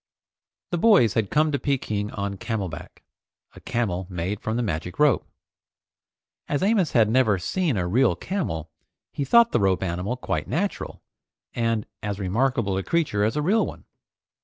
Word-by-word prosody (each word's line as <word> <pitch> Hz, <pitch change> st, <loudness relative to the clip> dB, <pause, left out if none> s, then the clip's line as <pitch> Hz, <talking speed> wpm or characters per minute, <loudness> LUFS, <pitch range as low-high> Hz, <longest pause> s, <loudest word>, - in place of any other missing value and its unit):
The 175 Hz, -, 0 dB
boys 185 Hz, -, +5 dB
had 110 Hz, -4 st, 0 dB
come 155 Hz, +1 st, +2 dB
to 140 Hz, -, 0 dB
Peking 110 Hz, -7 st, -1 dB
on 100 Hz, -1 st, -3 dB
camel 105 Hz, -3 st, -3 dB
back, 75 Hz, -, -10 dB, 0.5 s
a -, -, -13 dB
camel 95 Hz, -6 st, -2 dB
made 90 Hz, +3 st, -3 dB
from 110 Hz, +1 st, -2 dB
the 120 Hz, -, 0 dB
magic 90 Hz, -2 st, -3 dB
rope. 150 Hz, -7 st, +3 dB, 1.2 s
As 145 Hz, +4 st, 0 dB
Amos 195 Hz, -5 st, +2 dB
had 115 Hz, -3 st, +5 dB
never 110 Hz, -3 st, +3 dB
seen 155 Hz, -, -1 dB
a 90 Hz, -2 st, -1 dB
real 115 Hz, 0 st, +3 dB
camel, 85 Hz, -, -4 dB, 0.4 s
he 145 Hz, -, -2 dB
thought 235 Hz, -, +5 dB
the -, -, +2 dB
rope 95 Hz, -2 st, +2 dB
animal 95 Hz, +7 st, -2 dB
quite -, -, -3 dB
natural, 195 Hz, +5 st, -3 dB, 0.5 s
and 115 Hz, -2 st, 0 dB, 0.2 s
as 105 Hz, -2 st, -3 dB
remarkable 105 Hz, +1 st, 0 dB
a -, -, -3 dB
creature 150 Hz, -, 0 dB
as 110 Hz, +5 st, +1 dB
a 150 Hz, -, 0 dB
real 210 Hz, +7 st, +3 dB
one. -, -, -10 dB
110 Hz, 165 wpm, -24 LUFS, 95-145 Hz, 1.2 s, boys